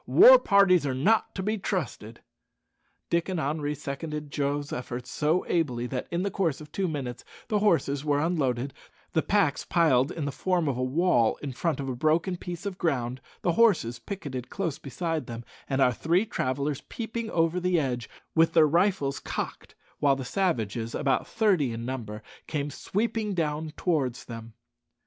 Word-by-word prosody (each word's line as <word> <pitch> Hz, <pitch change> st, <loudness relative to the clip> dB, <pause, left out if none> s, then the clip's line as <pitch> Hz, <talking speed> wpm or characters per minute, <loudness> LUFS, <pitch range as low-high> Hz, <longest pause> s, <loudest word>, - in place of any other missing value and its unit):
War -, -, +9 dB
parties 195 Hz, -, +5 dB
are 130 Hz, -, -1 dB
not 210 Hz, +12 st, +2 dB
to 190 Hz, -, -3 dB
be 215 Hz, +2 st, -1 dB
trusted." 130 Hz, -, -4 dB, 0.9 s
Dick 170 Hz, +2 st, +1 dB
and 185 Hz, -3 st, -1 dB
Henri 150 Hz, 0 st, -1 dB
seconded 150 Hz, +1 st, -5 dB
Joe's 145 Hz, 0 st, -1 dB
efforts 125 Hz, 0 st, -5 dB
so 155 Hz, +4 st, +1 dB
ably 130 Hz, -9 st, 0 dB
that 125 Hz, 0 st, -4 dB
in 170 Hz, +2 st, -1 dB
the 200 Hz, -, -1 dB
course 175 Hz, -7 st, 0 dB
of 150 Hz, -1 st, -12 dB
two 195 Hz, -1 st, -1 dB
minutes 135 Hz, -6 st, -4 dB, 0.3 s
the 210 Hz, -, +2 dB
horses 160 Hz, -9 st, +2 dB
were 145 Hz, -1 st, +2 dB
unloaded, 140 Hz, -6 st, 0 dB, 0.4 s
the 160 Hz, -, +3 dB
packs 195 Hz, -8 st, +1 dB
piled 145 Hz, -6 st, +3 dB
in 160 Hz, -, -4 dB
the 145 Hz, -, -2 dB
form 180 Hz, +1 st, 0 dB
of 135 Hz, -, 0 dB
a 125 Hz, -, -3 dB
wall 130 Hz, -4 st, +2 dB
in 140 Hz, -, -3 dB
front 160 Hz, +4 st, -1 dB
of 135 Hz, -, -3 dB
a 130 Hz, -, -2 dB
broken 160 Hz, +7 st, +1 dB
piece 175 Hz, +2 st, -7 dB
of 195 Hz, -2 st, -4 dB
ground, 130 Hz, -5 st, -1 dB, 0.2 s
the 175 Hz, -, +3 dB
horses 165 Hz, -, +3 dB
picketed 140 Hz, -, -6 dB
close 165 Hz, -6 st, -3 dB
beside 160 Hz, +3 st, -3 dB
them, 115 Hz, -1 st, -7 dB, 0.2 s
and 135 Hz, 0 st, +1 dB
our 125 Hz, -, +4 dB
three 170 Hz, -, +1 dB
travellers 140 Hz, -, -2 dB
peeping 230 Hz, 0 st, -4 dB
over 165 Hz, 0 st, +1 dB
the 180 Hz, -1 st, +2 dB
edge, 125 Hz, -6 st, -2 dB, 0.2 s
with 165 Hz, 0 st, +4 dB
their 160 Hz, -2 st, +7 dB
rifles 170 Hz, -3 st, +1 dB
cocked, -, -, -5 dB, 0.2 s
while 140 Hz, -2 st, +4 dB
the 135 Hz, -1 st, -5 dB
savages 115 Hz, -, -1 dB
about 135 Hz, -2 st, +1 dB
thirty 190 Hz, -, +2 dB
in 115 Hz, +1 st, -5 dB
number 110 Hz, -5 st, -5 dB, 0.2 s
came 145 Hz, -2 st, -2 dB
sweeping 210 Hz, -, -2 dB
down 155 Hz, -1 st, -1 dB
towards 140 Hz, -9 st, 0 dB
them. 115 Hz, -1 st, -8 dB
150 Hz, 175 wpm, -27 LUFS, 130-180 Hz, 0.9 s, War